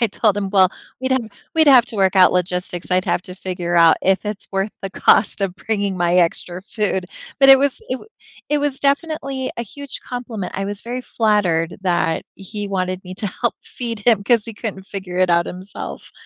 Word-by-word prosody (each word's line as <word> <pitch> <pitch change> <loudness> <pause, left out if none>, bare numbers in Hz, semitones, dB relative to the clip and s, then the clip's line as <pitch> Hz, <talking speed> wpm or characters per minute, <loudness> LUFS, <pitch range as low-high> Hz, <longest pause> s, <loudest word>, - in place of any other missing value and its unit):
I 235 - +4
told 210 -1 +1
him, 200 -2 -2
"Well, 190 -2 +5 0.3
we'd 260 0 -2
have 260 -4 +1 0.3
we'd 320 -1 +4
have 260 -4 +8
to 225 - -7
work 190 -2 +3
out 185 -2 +7
logistics. 180 0 -2
I'd 185 0 +2
have - - 0
to 180 - -9
figure 180 -2 -4
out 165 -1 +6
if 190 +2 +2
it's 210 -1 -5
worth 195 +2 0
the 195 - -5
cost 195 +2 +3
of 190 -2 -1
bringing 200 -1 -2
my 175 -1 +1
extra 175 +1 +1
food." 200 -3 -2 0.3
But 270 - +7
it 270 - +10
was 280 0 0
it 255 - -1
w 260 - -9 0.4
it 295 - +2
was 285 -2 -1
definitely 280 -2 0
a 235 - -2
huge 280 +5 -7
compliment, 235 -6 -5
I 195 - -2
was 205 0 -5
very 245 +2 -4
flattered 205 -9 +1
that 175 -3 0
he 205 +1 -6
wanted 185 -1 -2
me 185 0 -8
to 205 - -3
help 235 +5 -2
feed 230 -3 -5
him 210 -1 +3
'cause 230 +1 +3
he 230 - -7
couldn't 205 -3 -6
figure 190 -3 -5
it 185 0 +3
out 170 0 +3
himself. 185 +2 -8
200 Hz, 210 wpm, -20 LUFS, 185-235 Hz, 0.4 s, it